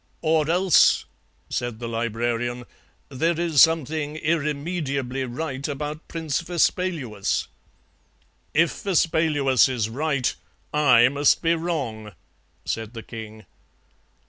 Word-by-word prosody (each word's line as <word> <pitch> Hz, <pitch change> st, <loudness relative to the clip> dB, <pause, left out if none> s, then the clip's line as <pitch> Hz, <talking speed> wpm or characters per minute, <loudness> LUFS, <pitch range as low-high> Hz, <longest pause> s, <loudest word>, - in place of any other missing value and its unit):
"'Or 155 Hz, -1 st, +2 dB
else,' 180 Hz, 0 st, +4 dB, 0.5 s
said 120 Hz, -3 st, -3 dB
the 120 Hz, 0 st, -6 dB
Librarian, 120 Hz, +1 st, -2 dB, 0.5 s
'there 160 Hz, +5 st, 0 dB
is 165 Hz, -5 st, +3 dB
something 155 Hz, -2 st, +2 dB
irremediably 145 Hz, -4 st, -2 dB
right 135 Hz, +2 st, -4 dB
about 150 Hz, +2 st, -5 dB
Prince 160 Hz, -4 st, -2 dB
Vespaluus.' 165 Hz, -, -1 dB, 1.0 s
"'If 165 Hz, +1 st, +1 dB
Vespaluus 155 Hz, -, +2 dB
is 115 Hz, -4 st, -1 dB
right 140 Hz, -1 st, 0 dB, 0.4 s
I 125 Hz, -6 st, +5 dB
must 145 Hz, +4 st, +2 dB
be 165 Hz, 0 st, +3 dB
wrong,' 135 Hz, -, -3 dB, 0.5 s
said 115 Hz, +1 st, -4 dB
the 115 Hz, -, -7 dB
king. 110 Hz, -2 st, -9 dB
145 Hz, 100 wpm, -24 LUFS, 120-160 Hz, 1.0 s, I